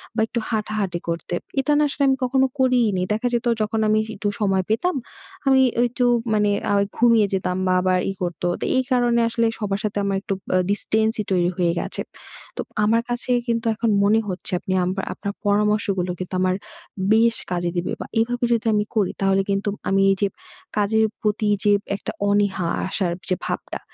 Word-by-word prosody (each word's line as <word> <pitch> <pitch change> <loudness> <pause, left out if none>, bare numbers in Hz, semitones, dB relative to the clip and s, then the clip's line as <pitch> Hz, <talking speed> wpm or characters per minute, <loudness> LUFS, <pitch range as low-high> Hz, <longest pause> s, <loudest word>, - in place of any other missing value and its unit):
বা 220 - +1
একটু 235 - -2
হাঁটাহাঁটি 210 -5 -2
করতে। 170 +1 -3 0.3
এটা 270 +2 +1
না 300 - +4
আসলে 280 - -1
আমি 265 0 +3
কখনো 265 +1 +3
করিইনি। 245 -7 +3
দেখা 220 +4 -1
যেত 240 +1 0 0.2
যখন 215 +1 0
আমি 215 0 +3 0.2
একটু 200 +1 -3
সময় 190 -2 +2
পেতাম, 345 +12 +1 0.5
আমি 265 -1 +5 0.2
একটু 245 +1 +1 0.3
মানে 210 -1 +3 0.2
আ - - +3
ওই 200 - +2
ঘুমিয়ে 230 -3 +5
যেতাম 185 -1 -1
বা 185 - +3
আবার 185 0 +2
ই - - -2
করত। 175 -2 -4 0.2
তো - - -1
এই 260 - +3
কারণে 240 -2 +3
আসলে 230 0 0
সবার 200 -2 -1
সাথে 210 -1 -2
আমার 200 -1 0
একটু 200 0 -3 0.2
আ - - +5
ডিসট্যান্সই 220 +2 0
তৈরি 175 -2 +3
হয়ে 175 -2 +2
গেছে। - - -4 0.5
তো - - -3 0.2
আমার 225 +2 +3
কাছে 240 +1 -2 0.2
কিন্তু 230 -1 -1
এখন 230 +1 0
মনে 210 +2 +4
হচ্ছে 185 +1 -5
আপনি 185 - -3
আম 180 - 0 0.2
আপনার 200 - -5
পরামর্শগুলো 205 -3 +1
কিন্তু 185 0 -6
আমার 185 0 +2 0.6
বেশ 230 +1 +4 0.2
কাজে 175 -1 0
দিবে। 175 - -1
বা - - -4
এভাবে 245 +2 0
যদি 230 -1 +1
আমি 210 0 +2
করি, 205 -4 +2
তাহলে 195 0 +3
কিন্তু 200 +1 0 0.2
আমি 195 0 +3
এই - - +2
যে 200 - +3 0.5
কাজের 220 +2 +3 0.2
প্রতি 210 0 0 0.2
যে 205 - +4 0.2
একটা 200 - -5 0.2
অনীহা 200 -3 +1 0.2
আসার 185 -2 -1 0.2
যে 185 - +2
ভাবটা, - - -4
210 Hz, 190 wpm, -22 LUFS, 195-230 Hz, 0.6 s, আমি